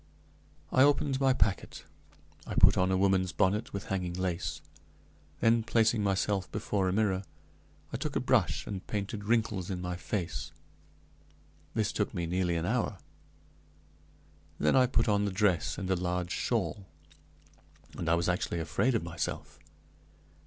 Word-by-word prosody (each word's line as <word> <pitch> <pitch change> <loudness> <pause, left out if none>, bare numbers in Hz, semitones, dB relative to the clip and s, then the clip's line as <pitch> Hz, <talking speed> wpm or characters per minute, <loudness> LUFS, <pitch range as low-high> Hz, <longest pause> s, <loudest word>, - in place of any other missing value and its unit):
I 130 - +4
opened 140 -1 +3
my 135 -1 +4
packet, 100 -5 -1 0.6
I - - -4
put - - +6
on 95 +1 +2
a 95 - +2
woman's 95 -1 +2
bonnet 100 +5 +1
with 100 0 -4
hanging 90 -3 -2
lace; 90 -1 -2 0.8
then, 115 0 +4
placing 110 0 +2
myself 100 -1 0
before 100 -2 -1
a - - 0
mirror, 95 -1 +1 0.7
I - - -1
took - - -4
a - - +2
brush - - +1
and 95 -3 -6
painted 105 0 -4
wrinkles 110 -5 0
in 95 -2 -3
my 90 0 -3
face. 90 -1 -4 1.2
This 110 -1 +1
took 105 0 -2
me 85 -2 -1
nearly 90 0 0
an 85 0 -1
hour. - - 0 1.6
Then 75 - +3
I 130 -1 +5
put 130 - +1
on 105 -1 +2
the 100 - -1
dress 95 -7 +1
and 95 - -4
a - - +3
large 90 0 -2
shawl, 100 -3 -1 1.1
and 85 - -3
I 85 - +5
was 85 0 0
actually 90 -1 -1
afraid 120 - +1
of 110 - 0
myself. 85 0 -5
95 Hz, 150 wpm, -30 LUFS, 90-105 Hz, 1.6 s, put